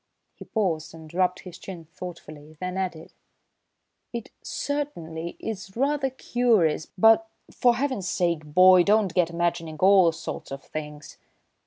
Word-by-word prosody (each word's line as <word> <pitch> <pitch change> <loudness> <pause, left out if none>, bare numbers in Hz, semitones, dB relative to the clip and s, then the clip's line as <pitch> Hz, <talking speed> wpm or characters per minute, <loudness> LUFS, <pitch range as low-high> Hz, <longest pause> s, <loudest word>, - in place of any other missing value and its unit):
He - - -12
paused 165 -8 -2
and 160 -1 -12
rubbed 180 0 +1
his 180 -2 -11
chin 175 -4 -9
thoughtfully, 155 -3 -10
then 180 0 -4
added: 180 -4 -4 1.0
"It 235 -2 -6
certainly 170 - -4
is 195 -2 -6
rather 275 +1 +1
curious, 230 -12 +1
but, 225 +2 +5 0.2
for 245 -1 +3
Heaven's 250 -8 -2
sake, 170 -3 0
boy, 185 +4 +6
don't 205 0 +3
get 175 -3 +2
imagining 170 -2 -2
all 185 0 +6
sorts 165 +1 -7
of 135 +1 -6
things!" 150 -1 -8
180 Hz, 135 wpm, -25 LUFS, 160-220 Hz, 1.0 s, boy